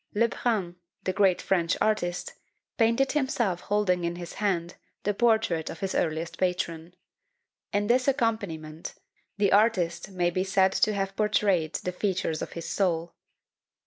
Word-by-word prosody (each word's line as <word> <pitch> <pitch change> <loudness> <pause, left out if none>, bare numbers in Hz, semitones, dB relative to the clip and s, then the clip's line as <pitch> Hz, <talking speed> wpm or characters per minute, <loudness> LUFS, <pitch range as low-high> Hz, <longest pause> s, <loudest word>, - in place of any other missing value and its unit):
Le 230 +3 +4
Brun, 200 -8 -1 0.3
the 185 - -1
great 195 -2 +3
French 170 -3 +1
artist, 180 -5 0 0.4
painted 230 +4 +2
himself 240 - 0
holding 195 -4 +1
in 170 0 -1
his 175 -1 -7
hand 180 -4 -1 0.3
the 205 - +1
portrait 220 -7 +2
of 165 - -7
his 195 -1 -2
earliest 160 +1 -1
patron. 175 -2 -2 0.8
In 205 0 +1
this 250 +4 +2
accompaniment 200 - -2 0.4
the 200 -1 +2
Artist 195 -5 +2
may 175 -2 0
be 185 +2 0
said 190 0 +3
to 215 +2 +2
have 195 0 -2
portrayed 200 -6 +1
the 180 - -2
features 180 -4 -1
of - - -5
his 170 - -6
soul. 170 -4 0
190 Hz, 145 wpm, -27 LUFS, 170-210 Hz, 0.8 s, Le